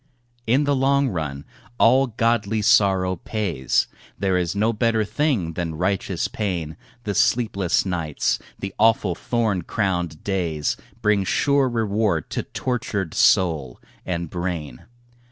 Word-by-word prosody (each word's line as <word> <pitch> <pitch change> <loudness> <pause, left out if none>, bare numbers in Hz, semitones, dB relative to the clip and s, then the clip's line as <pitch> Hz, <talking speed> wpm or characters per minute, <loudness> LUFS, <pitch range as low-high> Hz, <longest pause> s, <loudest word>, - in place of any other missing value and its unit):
In 130 +6 +3
the 145 -1 +1
long 135 +1 +2
run 75 -7 -4 0.3
all 130 +4 +5
godly 110 -2 0
sorrow 95 -3 +3
pays, 85 - 0 0.3
There 95 -2 +1
is 90 0 0
no 110 +3 +2
better 115 -1 +1
thing 115 - 0
than 80 -1 -3
righteous 95 0 -1
pain, 85 -7 -3 0.3
The 105 - -2
sleepless 100 -6 +2
nights, 85 -6 -1 0.2
the 95 -1 -6
awful 110 -5 +3
thorn 110 0 -1
crowned 90 -5 -2
days, 85 -6 -1 0.3
Bring 105 -2 +3
sure 140 +7 +2
reward 105 -7 0
to - - -1
tortured 105 -8 -3
soul 75 -9 +2 0.2
and 85 -2 -3
brain. 85 -6 -5
95 Hz, 125 wpm, -23 LUFS, 85-115 Hz, 0.3 s, all